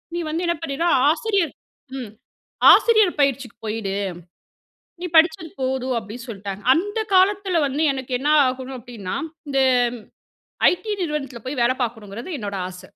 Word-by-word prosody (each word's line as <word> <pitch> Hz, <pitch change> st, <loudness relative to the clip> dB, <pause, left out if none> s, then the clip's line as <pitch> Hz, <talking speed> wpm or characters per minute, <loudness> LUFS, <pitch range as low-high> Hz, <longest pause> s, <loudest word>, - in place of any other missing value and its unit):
நீ -, -, -1 dB
வந்து 325 Hz, +3 st, -2 dB
என்ன 340 Hz, 0 st, +1 dB
பண்ணின்னா 325 Hz, +1 st, -1 dB, 0.2 s
ஆசிரியர் 370 Hz, +1 st, 0 dB, 0.4 s
ம். 245 Hz, -5 st, -6 dB, 0.6 s
ஆசிரியர் 435 Hz, -8 st, +4 dB
பயிற்சிக்கு 275 Hz, -3 st, 0 dB
போயிடு 215 Hz, -3 st, -3 dB, 1.1 s
நீ -, -, -2 dB
படிச்சது 320 Hz, 0 st, +4 dB
போதும் 260 Hz, 0 st, -1 dB
அப்டின்னு 225 Hz, +3 st, -8 dB
சொல்ட்டாங்க. 200 Hz, -2 st, -6 dB
அந்த 410 Hz, +7 st, -1 dB, 0.2 s
காலத்துல 380 Hz, -1 st, +3 dB
வந்து 280 Hz, +3 st, -1 dB
எனக்கு 265 Hz, -1 st, -6 dB
என்ன 290 Hz, +4 st, 0 dB, 0.2 s
ஆகணும் 260 Hz, +1 st, -4 dB
அப்டின்னா 225 Hz, -6 st, -6 dB, 0.3 s
இந்த 275 Hz, -1 st, +1 dB, 1.1 s
ஐடி 425 Hz, +5 st, -4 dB
நிறுவனத்துல 285 Hz, -7 st, -3 dB
போய் 260 Hz, 0 st, -3 dB
வேலை 250 Hz, +2 st, +2 dB
பார்க்கணுங்கறது 225 Hz, -, -6 dB
என்னோட 200 Hz, -2 st, -4 dB
ஆச 180 Hz, 0 st, -11 dB
270 Hz, 135 wpm, -22 LUFS, 235-335 Hz, 1.1 s, ஆசிரியர்